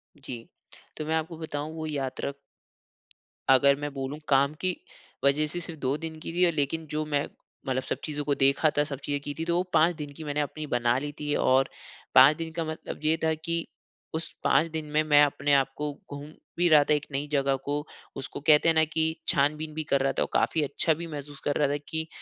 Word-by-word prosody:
जी, 125 -5 -8 0.5
तो 155 - -4
मैं 160 +1 0
आपको 160 +1 -2
बताऊँ 155 -1 -5
वो 160 -1 -4
यात्रा 140 -1 -3 1.2
अगर 140 +1 +6
मैं 145 0 -3
बोलूँ 135 +2 -4
काम 140 +1 +4
की 185 -1 0 0.5
वज़ह 145 +2 +3
से 175 +4 -3
सिर्फ़ 165 -2 -6
2 135 +1 0
दिन 160 0 -6
की 165 - -6
थी। 175 0 +4
लेकिन 155 +1 -1
जो 155 0 -1
मैं 145 -1 0 0.4
मतलब 130 0 0
सब - - -3
चीज़ों 150 -1 -3
को 145 0 +2
देखा 140 +3 +3
था 145 - +5
सब 140 -2 -5
चीज़ें 145 -1 -1
की 145 - -5
थी 165 - -1
तो 170 0 +1
वो 180 - +2
5 170 +2 +4
दिन 150 -2 -6
की 160 - -7
मैंने 150 0 -1
अपनी 150 +1 -4
बना 120 -1 +2
ली 145 +1 -4
थी। 150 -1 -1
और 130 +1 +3 0.5
5 135 +4 +9
दिन 165 -1 -5
का 165 0 -2
मतलब 160 0 -6
ये 155 +1 +3
था 160 0 +3
कि 165 +1 -2 0.5
उस 165 - -3
5 160 - +4
दिन 160 -1 -3
में 155 +1 +3
मैं 150 -1 +6
अपने 145 0 +1
आप 135 -1 +3
को 150 0 -2 0.2
घूम 145 +1 -7 0.3
भी 175 +1 +4
रहा 150 -2 +7
था 150 - +6
एक 150 0 0
नई 140 +2 -2
जगह 140 -1 +2
को, 145 +2 -3 0.3
उसको 135 - -5
कहते 155 +1 +5
हैं - - +5
ना 160 - +5
कि 160 0 +1
छान-बीन 150 +2 +1
भी 155 +1 -3
कर 140 - +4
रहा 135 0 +2
था - - +3
ओ, - - 0
काफ़ी 160 - +2
अच्छा 145 +3 +1
भी 170 +2 -6
महसूस 145 -2 -7
कर 145 - +1
रहा 145 - +3
था 145 - 0
कि 160 0 -3
150 Hz, 230 wpm, -27 LUFS, 140-160 Hz, 1.2 s, 5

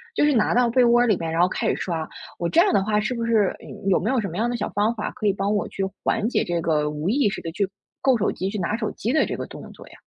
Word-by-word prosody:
就 - - +3
是 295 - +3
拿 225 -4 +2
到 245 -1 +4
被 250 +1 +4
窝 240 +1 +5
里 215 -4 +3
面 165 -1 -3
然 165 - -1
后 180 - +5
开 - - -2
始 - - +1
刷， 165 -3 -3 0.3
我 170 - -1
这 330 - +3
样 385 +1 +3
的 195 - +3
话 210 +1 +1
是 215 +4 -1
不 235 -1 -3
是 220 -4 +2 0.3
有 195 - +4
没 210 - -1
有 260 -1 +2
什 205 - -2
么 170 -1 -6
样 230 +3 +1
的 240 - -2
小 - - -2
方 210 +3 +1
法 210 - -3
可 - - -6
以 - - +5
帮 200 +1 -1
我 205 - -1
去 195 - -3 0.2
缓 225 -1 +1
解 245 - +1
这 175 -1 -1
个 150 -2 +1
无 150 +2 -4
意 245 -1 +2
识 205 - -5
地 165 - -5
去 195 +3 -1 0.3
够 265 -3 +3
手 210 - 0
机 190 - -3
去 210 - -4
拿 185 +4 -1
手 220 -2 -2
机 235 - -2
的 310 - +3
这 - - -4
个 - - -4
动 - - -10
作 - - -14
呀？ - - -16
210 Hz, 345 characters per minute, -23 LUFS, 180-235 Hz, 0.3 s, 窝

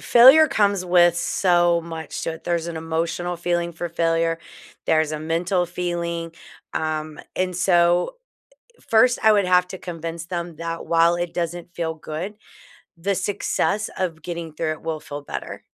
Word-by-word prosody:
failure 265 +6 +8
comes 200 -7 +2
with 175 -1 +5
so 175 -1 +2
much 165 -2 -6
to 165 - -2
it. 160 - -11
There's 170 -1 -1
an 170 -1 -5
emotional 165 +2 -2
feeling 170 0 -1
for 170 +1 -4
failure. 165 0 +1 0.5
There's 155 -1 +2
a 155 - -3
mental 175 +3 0
feeling. 170 -1 -3 0.4
Um, 155 -1 -2 0.2
and 185 0 0
so 175 - +3 0.7
1st, 240 +2 +5
I 220 - +7
would 205 -2 +3
have 180 0 +4
to 190 - -6
convince 165 -1 -6
them 170 -2 -5
that 165 0 -5
while 170 +1 +4
it 175 0 -3
doesn't 175 0 -4
feel 160 -1 -2
good, 160 +6 -6 0.6
the 195 +4 -1
success 205 +2 -1
of 170 -4 -2
getting 170 -2 -6
through 155 0 -1
it 155 - -12
will 160 -1 -3
feel 145 -1 -7
better. - - -6
170 Hz, 160 wpm, -23 LUFS, 165-180 Hz, 0.7 s, failure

